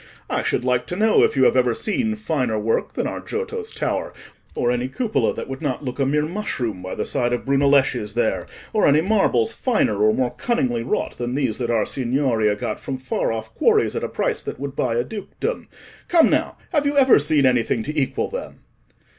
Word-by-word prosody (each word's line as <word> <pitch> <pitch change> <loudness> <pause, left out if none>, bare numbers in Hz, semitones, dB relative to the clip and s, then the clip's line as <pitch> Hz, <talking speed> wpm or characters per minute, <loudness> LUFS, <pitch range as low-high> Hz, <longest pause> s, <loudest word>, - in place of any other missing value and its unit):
I - - +1
should 125 - -1
like 125 -1 +1
to 175 - -3
know 215 +3 +4
if - - +3
you 130 - +5
have - - +4
ever 125 -2 +3
seen 220 +1 -1
finer 140 - -1
work 110 +2 -1
than - - -2
our - - -3
Giotto's 450 0 -5
tower, - - -2 0.4
or 120 - +1
any 125 +1 -1
cupola 220 - 0
that - - -5
would 135 +1 -6
not 145 -2 -2
look 125 +2 -5
a 135 - +2
mere 150 +2 +1
mushroom 140 - -3
by 95 0 -5
the - - -2
side 120 -3 0
of 120 - -2
Brunelleschi's 140 -6 +2
there, - - 0 0.3
or - - +3
any 145 +2 +5
marbles 185 - +2
finer 160 - 0
or 110 0 +5
more 125 +2 0
cunningly 125 - 0
wrought 120 - -2
than 120 +1 -2
these 130 -6 -1
that 120 -2 -2
our 115 -3 +2
Signoria 120 -5 0
got 105 - -4
from 135 -2 -4
far 130 -2 -2
off 110 0 -5
quarries, - - +2
at - - -2
a - - -2
price - - -1
that - - -6
would 140 0 -5
buy 120 -4 0
a 120 - +1
dukedom. 220 - -5 0.4
Come, 340 -2 +5
now, - - 0
have 295 -4 +2
you 285 0 0
ever 265 - +6
seen 145 -1 +2
anything 120 -3 +2
to 150 +5 -5
equal 140 -4 0
them?" - - -7
130 Hz, 215 wpm, -22 LUFS, 120-180 Hz, 0.4 s, ever